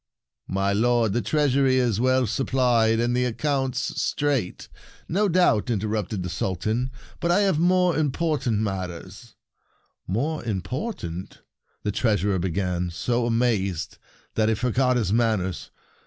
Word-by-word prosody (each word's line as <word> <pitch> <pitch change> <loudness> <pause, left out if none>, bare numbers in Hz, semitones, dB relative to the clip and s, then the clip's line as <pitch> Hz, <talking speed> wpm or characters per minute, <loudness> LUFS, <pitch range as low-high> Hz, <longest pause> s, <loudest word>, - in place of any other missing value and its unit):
"My 95 +1 0
lord, 115 0 +2
the 120 - +1
treasury 135 +2 +2
is 120 -5 +1
well 130 0 +3
supplied, 120 -2 +2
and 120 +1 +1
the 125 - +2
accounts 135 +2 -1
straight 120 -2 -1
— - - -21
" - - -27
" - - -33
No 200 +4 +1
doubt," 170 - +3
interrupted 105 -3 -2
the 90 - -4
Sultan; 110 +8 -1 0.3
"but 170 - -1
I 180 +4 +4
have 190 -6 +2
more 180 0 +3
im 150 -3 +1
portant 145 -7 0
matters 95 +2 -5 0.2
— - - -46 0.2
" - - -49
"More 155 +5 -1
important 105 - -5
— - - -57
" - - -44
the 105 - 0
Treasurer 100 -3 +1
began, 90 0 -1
so 120 +7 -1
amazed 110 -7 0 0.3
that 110 0 +2
he 110 - +2
forgot 125 +3 +1
his 105 -5 0
manners. 110 -6 0
115 Hz, 155 wpm, -24 LUFS, 100-135 Hz, 0.3 s, I